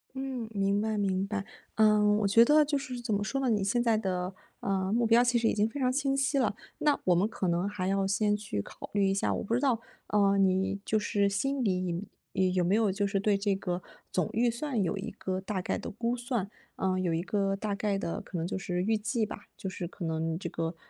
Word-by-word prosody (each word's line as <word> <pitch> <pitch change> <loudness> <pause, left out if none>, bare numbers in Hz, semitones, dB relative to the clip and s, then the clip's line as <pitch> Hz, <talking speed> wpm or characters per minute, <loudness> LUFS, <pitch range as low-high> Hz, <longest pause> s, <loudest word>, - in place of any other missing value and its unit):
嗯， 265 -4 -4
明 200 0 +1
白， 220 0 0
明 195 -1 0
白， 200 -1 -3 0.3
嗯， 210 -1 +5
我 200 - +2
觉 230 +4 +7
得 300 +2 +6
就 290 -1 0
是 255 -3 -5
怎 230 -2 -4
么 205 0 +1
说 270 +5 -2
呢？ 255 - +1
你 210 -3 +2
现 240 +5 +1
在 230 -2 +3
的， 185 -2 -2 0.2
嗯， 195 +1 -1
目 235 -1 +2
标 235 +2 +6
其 245 -1 +2
实 230 - +2
已 - - +2
经 210 +1 +3
非 280 +5 -6
常 255 -1 +2
清 275 0 +1
晰 275 +1 +1
啦， 230 -5 +2 0.2
那 300 -2 +2
我 180 -2 +4
们 195 +5 +3
可 210 -5 -3
能 175 +3 +1
还 195 -3 -3
要 195 0 +1
先 205 +1 +2
去 200 - -3
考 - - -10
虑 200 -1 +3
一 - - +2
下 195 - 0
我 - - -2
不 225 +3 0
知 - - +2
道， 255 -5 +2 0.3
呃， 200 -1 +3
你 190 +1 +2
就 215 - +2
是 205 -1 +1
心 265 +7 0
里 185 -1 -1 0.3
呃， 190 - +2
有 180 -1 +2
没 185 +4 +3
有 220 -3 +3
就 200 +1 0
是 195 0 0
对 205 0 +2
这 200 0 +1
个 180 -2 -3 0.3
总 180 -5 0
预 235 +2 +3
算 240 -4 -1
有 185 - -1
一 - - -4
个 190 -2 -4
大 190 -1 -3
概 - - -1
的 - - -6
估 235 +3 -1
算？ 240 -5 -2 0.3
嗯， 185 -1 0
有 175 -2 0
一 165 +1 0
个 195 -3 0
大 205 0 -3
概 200 0 0
的 170 - -3
可 180 - -7
能 165 - -1
就 - - -3
是 180 -1 -2
预 220 +2 +2
计 220 +2 -1
吧， 210 - -9
就 190 - -5
是 180 -2 -4
可 180 -1 -7
能 160 0 -1
这 - - -5
个， 165 +1 -3
205 Hz, 270 characters per minute, -30 LUFS, 190-230 Hz, 0.3 s, 觉